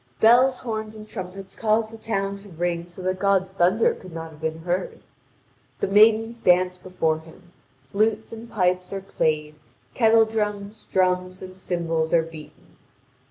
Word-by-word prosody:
Bells, 250 +3 +5
horns, 220 -2 -4
and 215 0 -10
trumpets 195 -1 -8
cause 220 0 +1
the 225 - -10
town 200 -3 -2
to 200 +1 -14
ring 170 0 -2
so 175 +1 -11
that 185 0 -1
God's 190 -1 +1
thunder 190 +4 +3
could 185 - -12
not 165 0 -6
have 155 0 -16
been 160 0 -3
heard. 180 +2 -2 0.8
The - - +1
maidens 225 +3 +4
dance 180 0 +3
before 180 -4 -1
him, 165 +2 -17 0.3
flutes 215 +8 0
and 230 +1 -9
pipes 180 -3 0
are 195 0 -4
played, 155 -5 -1 0.4
kettle 225 -1 +5
drums, 210 -1 -4
drums, 185 0 0
and 185 0 -9
cymbals 165 -3 -1
are 165 - +4
beaten. 160 -2 -13
190 Hz, 160 wpm, -24 LUFS, 175-215 Hz, 0.8 s, Bells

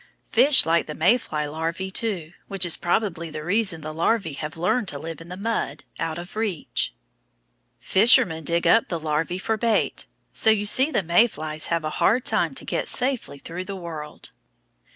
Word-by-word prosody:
Fish 280 0 +6
like 165 +1 +1
the 150 - -6
May 180 +9 +4
fly 155 -11 -3
larvæ, 165 +5 -4
too, 190 -10 -2 0.2
which 195 -2 +3
is 170 - +4
probably 175 -2 -1
the 155 0 -7
reason 190 -2 +1
the 155 +1 -6
larvæ 165 -1 0
have 155 +2 -6
learned 195 +7 0
to 145 - -2
live 165 +3 -7
in 165 - -12
the 180 - -7
mud, 225 +3 -3 0.2
out 165 0 -3
of 175 +3 -9
reach. 215 -7 -1 0.9
Fishermen 195 -6 +4
dig 170 +3 0
up 225 +7 +4
the 170 - -3
larvæ 155 +3 -2
for 220 +3 -1
bait, 230 0 0 0.3
so - - +3
you 210 -1 +2
see 260 +7 +3
the 240 -10 0
May 175 +8 +4
flies 155 -7 -5
have 170 -1 -1
a 155 - -2
hard 240 +4 +3
time - - +1
to - - -4
get - - -2
safely 250 - -1
through 175 +6 -7
the 200 +1 -6
world. 160 -5 -8
175 Hz, 190 wpm, -23 LUFS, 160-220 Hz, 0.9 s, Fish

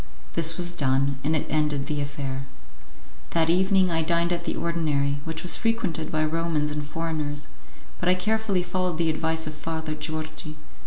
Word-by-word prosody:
This 165 0 +3
was 175 -1 +1
done, 140 -3 +1
and 155 +3 +2
it 150 - 0
ended 150 -2 +1
the 145 0 -1
affair. 140 -2 -4 0.9
That 165 0 +4
evening 190 0 +4
I 165 -1 +2
dined 170 +2 +2
at 170 0 -3
the - - -1
ordinary, 145 -4 0
which 160 -1 -4
was 180 - +4
frequented 225 -9 0
by 155 0 +2
Romans 155 -1 0
and 150 0 -2
foreigners; 150 -1 -3 0.5
but - - +2
I 180 - +6
carefully 210 -1 +1
followed 180 -1 -1
the 165 -1 +2
advice 160 +1 0
of 155 - -4
Father 160 0 -3
Georgi. 155 0 -5
160 Hz, 170 wpm, -26 LUFS, 150-170 Hz, 0.9 s, I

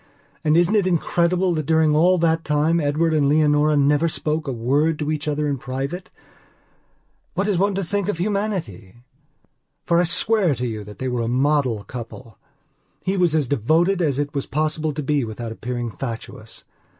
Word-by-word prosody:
And 155 0 +3
isn't 175 +4 +3
it 205 -3 +3
incredible 175 +1 +1
that 155 -3 -3
during 160 -2 +3
all 180 +4 +4
that 165 -1 +1
time 155 +3 +1
Edward 155 +2 +1
and 145 -3 +2
Leonora 150 0 +3
never 145 +3 +3
spoke 155 0 -2
a - - -1
word 140 +7 +1
to 150 0 -2
each 155 -1 -3
other 150 0 0
in 140 -2 -2
private? 135 +9 -5 1.3
What 200 - 0
is 195 -4 +1
one 200 0 +1
to 195 - -1
think 200 +2 -2
of 205 - -1
humanity? 185 - -3 0.9
For 170 0 +3
I 175 - +3
swear 180 -1 +2
to 125 +1 -3
you 110 -3 -4
that 105 0 -11
they 130 - -3
were 125 -1 -1
the 115 - -2
model 130 -3 +1
couple. 115 -2 -9 0.6
He 190 +1 0
was 175 -4 +2
as 150 -4 +1
devoted 160 - +2
as 145 -5 +1
it 145 0 -2
was 140 -2 -3
possible 155 +1 -1
to 150 +1 -5
be 145 0 +1
without 115 0 -6
appearing 120 +1 -4
fatuous. 115 -2 -8
150 Hz, 185 wpm, -22 LUFS, 130-170 Hz, 1.3 s, all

